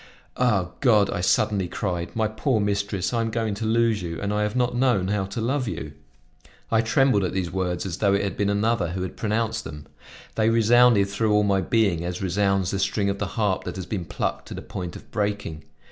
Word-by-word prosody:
"Ah! 100 -8 +1
God!" 110 -7 +4
I - - -2
suddenly 100 0 +2
cried, 90 -2 -3
"my 110 -1 +1
poor 110 +3 0
mistress, 100 -1 -1
I 115 - +1
am 115 - -1
going 110 -1 -1
to 105 +3 -4
lose 115 -1 +2
you 85 -2 -5
and 100 +1 -2
I 105 - 0
have 105 +1 -1
not 125 -1 +1
known 120 -7 +2
how 100 -1 0
to 100 +4 -6
love 125 +3 -1
you!" 75 -7 -5 0.8
I 115 0 +4
trembled 115 -2 +3
at 90 - -2
these 90 -3 -2
words 90 -1 -2
as 90 -3 -4
though 100 -2 +3
it 100 - 0
had 100 - -2
been 100 0 0
another 100 -4 0
who 95 0 -3
had 95 - -6
pronounced 110 +1 -1
them; 75 -1 -9 0.5
they 110 0 +2
resounded 115 -2 +5
through 105 +2 0
all 105 0 +4
my 100 -1 +2
being 100 -7 +1
as 90 0 -4
resounds 95 0 +1
the 100 - -2
string 100 0 +1
of 100 - -5
the 105 - -1
harp 105 -4 +1
that - - -5
has 95 -2 -5
been 95 -5 -4
plucked - - -3
to - - -7
the - - -7
point 90 -2 -6
of - - -12
breaking. 100 -7 -3
100 Hz, 225 wpm, -24 LUFS, 95-115 Hz, 0.8 s, resounded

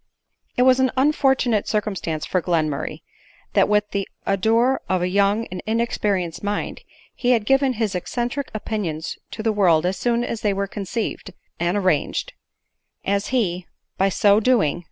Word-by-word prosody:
It 250 - +4
was 260 0 +5
an 260 0 +3
unfortunate 265 -5 +2
circumstance 195 -7 -2
for 185 - 0
Glenmurray 155 -5 -1
r - - -56 0.5
that - - +4
with 210 0 +2
the 200 -1 -2 0.2
ardor 225 +7 +2
of 185 -1 +1
a - - +1
young 200 +4 +2
and 185 - -5
inexperienced 205 -7 -1
mind, 205 0 -3 0.3
he 250 0 +2
had 225 -3 +1
given 270 +2 +3
his 220 -3 -1
eccentric 240 +9 -3
opinions 200 -7 -4
to 220 - -6
the 220 -1 +1
world 175 -6 +3
as 185 +1 0
soon 240 +2 +1
as 230 -2 -4
they 205 -2 +1
were 200 0 -1
conceived 205 +3 -4 0.3
and 175 +3 +1
arranged; 200 - 0 0.7
as 200 +1 0
he, 185 -9 -1 0.3
by 195 +1 +4
so 205 +2 +4
do 245 0 +3
ing 150 +3 -1
210 Hz, 165 wpm, -22 LUFS, 185-235 Hz, 0.7 s, was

